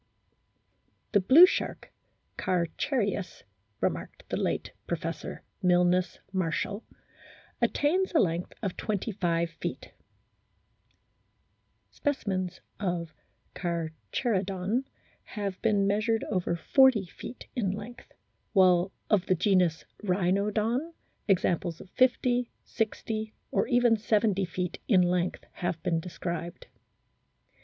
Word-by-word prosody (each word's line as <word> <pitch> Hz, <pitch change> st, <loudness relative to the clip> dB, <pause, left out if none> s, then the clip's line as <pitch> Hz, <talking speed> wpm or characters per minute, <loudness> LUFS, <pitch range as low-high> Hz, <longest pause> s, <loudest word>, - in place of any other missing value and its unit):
" -, -, -44 dB
The 205 Hz, -, +5 dB
blue 265 Hz, -, +9 dB
shark, 370 Hz, -, -3 dB, 0.4 s
Carcharias" 195 Hz, -, -1 dB, 0.4 s
remarked -, -, -3 dB
the -, -, -1 dB
late -, -, -1 dB, 0.2 s
Professor 165 Hz, -1 st, -4 dB, 0.2 s
Milnes 180 Hz, 0 st, +3 dB, 0.2 s
Marshall, 190 Hz, +4 st, -1 dB, 0.8 s
"attains 365 Hz, +6 st, +2 dB
a -, -, +7 dB
length 170 Hz, -1 st, 0 dB
of 195 Hz, -3 st, -2 dB
25 180 Hz, -5 st, -1 dB
feet; 160 Hz, -, -6 dB, 2.0 s
specimens 190 Hz, -, -2 dB, 0.2 s
of 175 Hz, -5 st, -2 dB, 0.4 s
Carcharo 175 Hz, +5 st, -2 dB
don 195 Hz, +7 st, -1 dB, 0.4 s
have 200 Hz, -3 st, -4 dB
been 205 Hz, -3 st, +3 dB
measured 215 Hz, +3 st, +1 dB
over 180 Hz, -3 st, 0 dB
40 255 Hz, +3 st, +4 dB
feet 210 Hz, +7 st, -9 dB
in 220 Hz, -7 st, 0 dB
length; 215 Hz, +5 st, -7 dB, 0.4 s
while 185 Hz, -2 st, +5 dB, 0.2 s
of 195 Hz, -4 st, +2 dB
the 185 Hz, -, +3 dB
genus 180 Hz, -3 st, +2 dB, 0.2 s
Rhinodon 210 Hz, -, 0 dB, 0.3 s
examples 175 Hz, -3 st, +1 dB
of 190 Hz, -, -13 dB
50, 250 Hz, -1 st, +2 dB
60, 220 Hz, 0 st, -3 dB, 0.2 s
or -, -, +1 dB
even 240 Hz, -1 st, +4 dB
70 210 Hz, -2 st, +2 dB
feet 180 Hz, 0 st, -4 dB
in 185 Hz, -5 st, +5 dB
length 180 Hz, 0 st, 0 dB
have 175 Hz, -2 st, -3 dB
been 165 Hz, -1 st, +1 dB
described." 170 Hz, 0 st, -5 dB
190 Hz, 100 wpm, -29 LUFS, 175-220 Hz, 2.0 s, blue